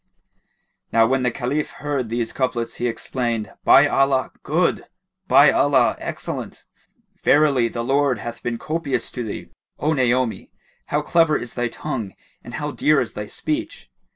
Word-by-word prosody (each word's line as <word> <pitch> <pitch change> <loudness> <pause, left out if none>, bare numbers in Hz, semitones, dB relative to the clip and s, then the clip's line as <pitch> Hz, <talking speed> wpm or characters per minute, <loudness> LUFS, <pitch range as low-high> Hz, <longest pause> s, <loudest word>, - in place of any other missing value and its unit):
Now 115 0 +5
when 130 +3 +1
the 125 - +2
Caliph 135 +5 -2
heard 140 -5 -3
these 115 0 -2
couplets, 120 -3 -2
he 120 - -1
exclaimed, 120 -2 -3
"By 140 - +7
Allah, 135 -2 +2
good! - - 0 0.4
By - - +7
Allah, - - +3
excellent! - - -6 0.6
Verily 140 -5 +4
the 115 0 -4
Lord 135 0 +2
hath 120 +3 -7
been 120 -1 -3
copious[FN#19] 155 0 -2
to 125 - -4
thee, 110 - -6 0.3
O 155 +2 +1
Naomi! 125 -3 0 0.4
How 150 0 0
clever 165 -1 +3
is 120 - -7
thy 120 -1 -1
tongue 120 -5 -5 0.3
and 120 - -8
how 150 +3 -3
dear 150 0 +3
is 120 - -3
thy 105 0 -5
speech!" 315 - -4
130 Hz, 155 wpm, -22 LUFS, 120-145 Hz, 0.6 s, By